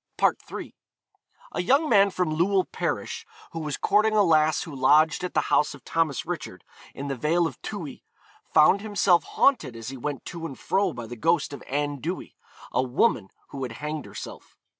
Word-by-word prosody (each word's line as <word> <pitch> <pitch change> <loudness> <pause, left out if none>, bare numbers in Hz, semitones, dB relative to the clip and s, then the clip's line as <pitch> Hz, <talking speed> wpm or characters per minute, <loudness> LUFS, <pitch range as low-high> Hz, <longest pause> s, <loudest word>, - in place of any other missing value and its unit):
III. - - -7 0.8
A - - -2
young 275 - +3
man 200 -6 +5
from 180 -4 -1
Llywel 185 +3 +2
parish, - - -3 0.3
who 165 - -5
was 150 -3 -3
courting 215 +1 +2
a 210 - +5
lass 155 -3 +3
who 155 -5 -8
lodged 155 +6 +4
at 180 - -4
the 155 - +4
house 150 - +3
of - - -16
Thomas 155 -7 0
Richard, - - -6 0.3
in 140 - -5
the 135 - -2
vale 165 +6 +1
of 135 -7 -5
Towy, 175 -9 -7 0.5
found 160 +6 +5
himself 200 -6 +3
haunted 155 - +2
as 115 0 -7
he 135 - -7
went 140 0 -5
to 170 -1 -7
and 135 - -9
fro 195 -1 +1
by 120 -6 -7
the 120 +2 -8
ghost 155 +3 +1
of - - -8
Anne 145 +1 -1
Dewy, 175 +7 -5 0.4
a - - +2
woman 125 - +1 0.2
who 140 - -7
had 125 -3 -4
hanged 150 +2 -5
herself. - - -10
155 Hz, 185 wpm, -26 LUFS, 140-180 Hz, 0.8 s, man